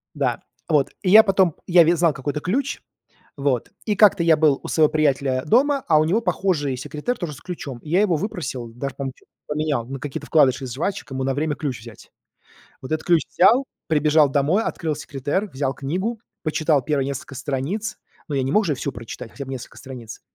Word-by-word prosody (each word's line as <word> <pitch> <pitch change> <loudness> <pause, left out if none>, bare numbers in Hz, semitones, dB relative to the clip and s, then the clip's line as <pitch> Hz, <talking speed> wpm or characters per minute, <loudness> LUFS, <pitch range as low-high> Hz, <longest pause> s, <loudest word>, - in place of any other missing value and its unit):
Да. 135 -5 -1 0.3
Вот, 150 -4 +2
и 185 - 0
я 220 +3 +9
потом 190 -5 +2
я 175 -1 +6
ведь 170 +1 +3
знал 165 -2 +3
какой 135 +1 -3
это 150 - -4
ключ, 250 - -1 0.6
вот, 140 -4 -1
и 210 -2 +1
как-то 205 -5 +5
я 165 -1 +5
был 150 -3 +3
у - - -6
своего 155 -2 +3
приятеля 140 -4 +1
дома, 275 - +3
а 155 -2 +5
у - - +4
него 200 +9 +1
похожий 155 - 0
секретер, 150 - -4
тоже 165 -5 -4
с 130 - -13
ключом. 155 -8 -6
И 150 - -12
я 180 +5 +3
его 195 -5 +2
выпросил, 155 - -4
даже, 130 +3 -6
по-моему, 135 -1 -4
на - - -24
чё-то - - -29 0.2
поменял, 150 -5 -1
на 135 +1 -6
какие-то 145 -1 -6
вкладыши 135 -4 +3
из 125 -2 -5
жвачек, 165 +1 -3
ему 130 0 -2
на 135 0 0
время 150 0 -1
ключ 140 -5 -4
взять. 115 0 -13 0.7
Вот 130 - -9
этот 155 - -2
ключ 170 -3 +4
взял, 235 +9 +4 0.2
прибежал 150 -1 +4
домой, 150 +10 +2
открыл 160 -8 -2
секретер, 145 +8 -3
взял 135 -4 -2
книгу, 185 - -3 0.2
почитал 155 -2 +1
первые 140 0 0
несколько 135 0 -6
страниц, 155 - -3 0.3
но 145 - -2
я 135 - +1
не 135 - -1
мог 215 - +4
же 150 - +1
всю 140 +2 -3
прочитать, 115 0 -8
хотя 140 - -7
бы 135 - -7
несколько 130 -2 -8
страниц. 125 -5 -9
150 Hz, 210 wpm, -22 LUFS, 135-175 Hz, 0.7 s, я